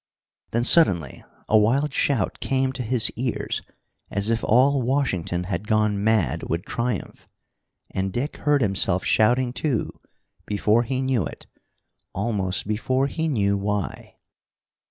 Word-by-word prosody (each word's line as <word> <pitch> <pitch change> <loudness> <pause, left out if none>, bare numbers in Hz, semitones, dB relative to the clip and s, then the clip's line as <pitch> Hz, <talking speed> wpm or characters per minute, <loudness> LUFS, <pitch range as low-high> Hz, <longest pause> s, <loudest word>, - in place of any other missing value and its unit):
Then 120 +1 0
suddenly 95 - +3 0.2
a 110 - +5
wild 135 +7 +1
shout 130 -10 0
came 130 -1 0
to 130 - -5
his 120 -1 +1
ears, 125 0 -3 0.5
as 100 +3 0
if 115 - -1
all 130 +4 +4
Washington 95 - -1
had 95 +2 -4
gone 105 -2 +1
mad 95 - +1
with 85 +2 -2
triumph. 115 -4 -4 0.6
And 95 0 -2
Dick 125 +9 -3
heard 145 -3 +2
himself 95 -2 +1
shouting 120 +3 +2
too, 130 -5 -1 0.6
before 105 +2 +2
he 130 +2 -2
knew 125 - 0
it, - - -11 0.7
almost 100 -5 -1
before 130 +5 0
he 160 +3 -2
knew 100 -9 +1
why. 100 -1 -3
110 Hz, 135 wpm, -24 LUFS, 100-130 Hz, 0.7 s, a